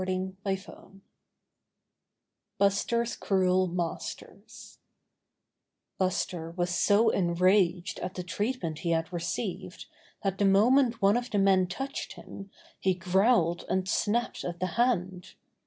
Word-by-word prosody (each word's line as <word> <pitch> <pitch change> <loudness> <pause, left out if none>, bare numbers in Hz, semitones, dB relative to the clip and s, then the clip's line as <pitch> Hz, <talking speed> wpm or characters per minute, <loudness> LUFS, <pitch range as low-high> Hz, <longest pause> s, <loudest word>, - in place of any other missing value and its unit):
4 - - -5 0.4
STORY 195 -1 +1
VI 195 +2 -11 1.8
Buster's 230 +4 +1
Cruel 185 -1 +2
Masters 175 -1 -6 1.2
Buster 180 -3 -1
was 175 +1 -2
so 205 +5 +4
enraged 180 0 +2
at 185 +1 -5
the 180 - -4
treatment 180 -3 -3
he 170 - -3
had 165 +1 -1
received 175 +4 -4 0.4
that 195 -1 -1
the 200 - +3
moment 235 +5 +4
one 200 +4 +5
of 245 0 -4
the 210 - -1
men 190 -2 +4
touched 270 +10 -5
him 195 0 -11 0.3
he 190 -1 +1
growled 180 -1 +2
and 190 0 0
snapped 230 +4 0
at 175 -1 -5
the 185 - 0
hand. 190 -7 -1
190 Hz, 125 wpm, -28 LUFS, 175-205 Hz, 1.8 s, one